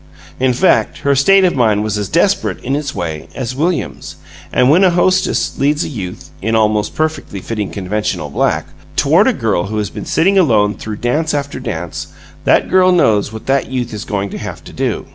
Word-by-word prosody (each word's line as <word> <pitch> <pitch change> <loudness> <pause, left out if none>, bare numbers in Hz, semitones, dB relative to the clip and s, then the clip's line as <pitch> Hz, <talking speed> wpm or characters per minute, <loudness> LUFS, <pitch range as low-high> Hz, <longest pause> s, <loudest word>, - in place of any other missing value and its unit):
In 130 0 +3
fact, 180 +9 +2
her 140 - +2
state 195 +8 +5
of 180 - +1
mind 110 -5 +2
was 110 -1 -1
as 105 -1 -3
desperate, 190 +4 +1
in 135 +3 -1
its 145 -1 -3
way, 80 -5 -4
as 125 -1 -4
William's; 160 +3 -2 0.4
and 125 - +3
when 165 +8 +5
a 185 - +6
hostess 185 +1 +1
leads 145 +3 +2
a - - -4
youth 95 - -7
(in 110 +3 0
almost 105 -1 +1
perfectly 155 -10 -2
fitting 105 0 -4
conventional 105 +2 -3
black) - - 0 0.3
toward 160 - +4
a - - +5
girl 110 - -1
who 110 +2 -4
has 105 -3 -2
been - - -7
sitting 195 +4 +3
alone 105 - +3
through 105 +1 -6
dance 150 +9 -1
after 140 -1 -3
dance, 90 -10 -5 0.4
that - - +3
girl 185 0 +4
knows 110 - +2
what 110 0 -9
that 135 0 +1
youth 125 -3 -3
is 105 - -5
going 100 -1 -3
to - - -6
have - - -7
to - - -12
do. - - -2
125 Hz, 200 wpm, -16 LUFS, 105-160 Hz, 0.4 s, a